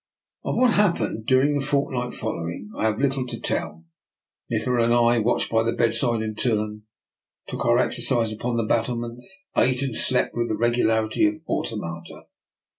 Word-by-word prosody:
Of - - -2
what 250 -1 +4
happened 170 - +1
during 135 +3 +4
the 145 -1 0
fortnight 130 -3 -1
following 100 -1 -5
I - - -1
have 110 -1 +1
little 135 -1 0
to - - -6
tell. 80 +1 -3 0.6
Nikola 125 -2 +1
and 120 +1 +3
I 120 0 +4
watched 115 +2 0
by 115 0 +3
the 115 +1 0
bedside 120 0 +1
in 110 0 -3
turn, 105 -2 -1 0.6
took - - -4
our - - +5
ex - - +1
ercise 115 -3 +1
upon 120 +3 -3
the 115 -1 0
battlements, 120 - -2
ate 130 +1 +2
and 130 -4 -2
slept 130 - +2
with 120 0 -1
the 110 - -1
regularity 110 -2 +2
of 105 - -1
automata. 85 0 -4
120 Hz, 170 wpm, -24 LUFS, 110-125 Hz, 0.6 s, our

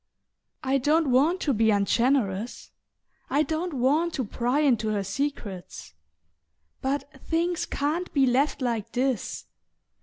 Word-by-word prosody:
"I 270 +1 +2
don't 300 +1 +2
want 305 +9 +3
to 285 - +1
be 220 0 +3
ungenerous; 220 +1 +1 0.6
I 290 +3 +3
don't 320 +1 -3
want 295 +7 +2
to 260 - -1
pry 245 +7 0
into 240 -7 +2
her 210 -2 0
secrets. 200 - -5 0.9
But 280 +2 -3
things 340 +1 -1
can't 315 +6 -2
be 275 -2 +3
left 265 +2 +1
like 230 -5 -2
this. 250 - -1
265 Hz, 125 wpm, -26 LUFS, 230-300 Hz, 0.9 s, want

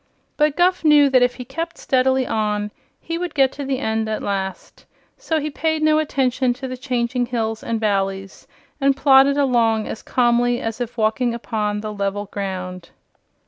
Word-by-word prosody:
But 300 -1 +2
Guph 360 0 +2
knew 295 -3 +5
that 255 -1 +5
if 245 0 +2
he 250 - -8
kept 330 +6 -5
steadily 260 0 +1
on 210 -2 -1 0.3
he 330 0 -4
would 355 -2 -4
get 270 -2 +4
to 285 0 -6
the 265 -1 -1
end 220 -4 -1
at 215 - -3
last; 190 -2 -5 0.3
so 325 -11 -2
he 300 0 -3
paid 315 +2 -1
no 310 0 +4
attention 260 -4 0
to 265 +1 -6
the 255 - -5
changing 245 -1 -1
hills 225 -2 -2
and 230 -1 -2
valleys 195 -2 -2 0.3
and 275 0 +3
plodded 275 0 +5
along 235 -5 +2
as 220 - -6
calmly 245 0 +2
as 225 +1 -4
if 240 0 -5
walking 230 +2 +1
upon 210 -3 -2
the 215 0 -5
level 200 0 -2
ground. 185 -3 -6
245 Hz, 180 wpm, -21 LUFS, 215-275 Hz, 0.3 s, knew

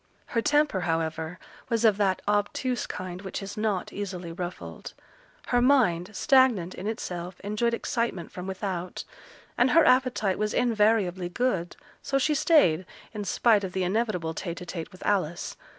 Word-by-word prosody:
Her 230 - -1
temper, 295 -6 +2
however, 165 0 -2 0.3
was 230 -1 +1
of 210 -3 +5
that 195 -3 +1
obtuse 210 +4 0
kind 185 0 -6
which 195 +1 -5
is 195 +1 -7
not 210 -4 -1
easily 185 -4 -5
ruffled; 175 +1 -7 0.5
her 245 -1 +3
mind, 220 -10 +3
stagnant 260 - +3
in 195 - -6
itself, 180 -5 -5
enjoyed 215 +3 0
excitement 230 -9 -2
from 180 +1 -7
without; 185 -2 -4 0.6
and 250 - +5
her 325 +4 +5
appetite 255 -6 +2
was 210 0 -1
invariably 210 -6 +2
good, 185 -5 -1 0.3
so 275 - 0
she 300 +3 +2
stayed, 230 - +4 0.3
in 210 -2 -4
spite 215 0 +3
of 185 -2 -4
the 190 - 0
inevitable 180 -4 -1
tete 170 +1 -5
a - - -6
tete 170 -2 -6
with 185 - -11
Alice. 175 -4 0
200 Hz, 155 wpm, -27 LUFS, 180-235 Hz, 0.6 s, of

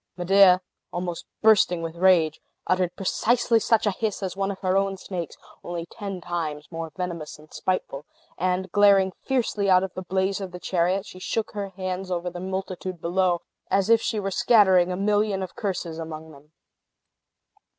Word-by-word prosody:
Medea, 185 0 +6 0.3
almost 175 -1 -4 0.2
bursting 200 -6 +4
with 165 0 -5
rage, 170 -3 +3 0.2
uttered 185 -1 0
precisely 230 +4 +2
such 225 +1 +2
a 205 - +3
hiss 210 0 -3
as 185 -1 -3
one 195 0 -1
of 200 - -4
her 185 -1 +1
own 195 0 +1
snakes, 180 -4 -6 0.3
only 170 -1 -4
ten 195 0 -6
times 160 -4 -4
more 165 -1 -5
venomous 170 -5 -5
and 155 +1 -18
spiteful; 150 -6 -3 0.3
and 185 +1 -1
glaring 200 -2 +5 0.2
fiercely 230 -6 0
out 185 0 +5
of 190 - -4
the 185 - -5
blaze 190 +2 -1
of 190 -2 -5
the 180 - -7
chariot, 185 +2 0
she 185 - -11
shook 220 +4 -2
her 200 -2 -4
hands 185 0 -3
over 180 0 -2
the 175 - -7
multitude 185 -1 -4
below, 175 +1 +1 0.3
as 195 +3 +2
if 230 -1 +6
she 215 - -1
were 195 -1 -2
scattering 190 -5 +4
a 180 - -2
million 205 -1 +1
of 185 - -8
curses 180 -5 -3
among 160 -1 -7
them. 145 +1 -17
185 Hz, 175 wpm, -25 LUFS, 175-195 Hz, 0.3 s, Medea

